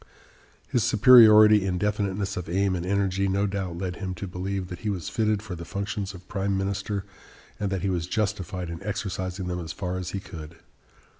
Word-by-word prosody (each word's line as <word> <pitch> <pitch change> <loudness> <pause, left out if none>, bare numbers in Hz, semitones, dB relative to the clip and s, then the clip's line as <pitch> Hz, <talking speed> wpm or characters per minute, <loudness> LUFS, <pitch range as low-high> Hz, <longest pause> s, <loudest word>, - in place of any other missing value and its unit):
His 120 - +1
superiority 110 -2 +8
in 95 -2 -1
definiteness 100 0 -1
of 90 -2 -5
aim 95 +1 +1
and 85 - -3
energy 100 0 +1
no 100 +1 +1
doubt 95 -4 -3
led 90 -1 -4
him 95 -2 -4
to 100 - -6
believe 95 +1 -4
that 90 -2 -7
he 110 - -3
was 95 -5 -3
fitted 105 -2 0
for 105 -5 -6
the 85 -1 -6
functions 100 +1 -4
of 90 0 -13
prime 100 0 -1
minister 100 +1 -2 0.5
and 100 -2 -2
that 95 -2 -2
he 100 - +1
was 85 -2 -2
justified 95 -4 -2
in 85 - -7
exercising 95 -2 -4
them 90 0 -3
as 85 0 -6
far 90 -1 -3
as 90 -1 -4
he 100 - -3
could. 80 -5 -10
95 Hz, 200 wpm, -26 LUFS, 90-100 Hz, 0.5 s, superiority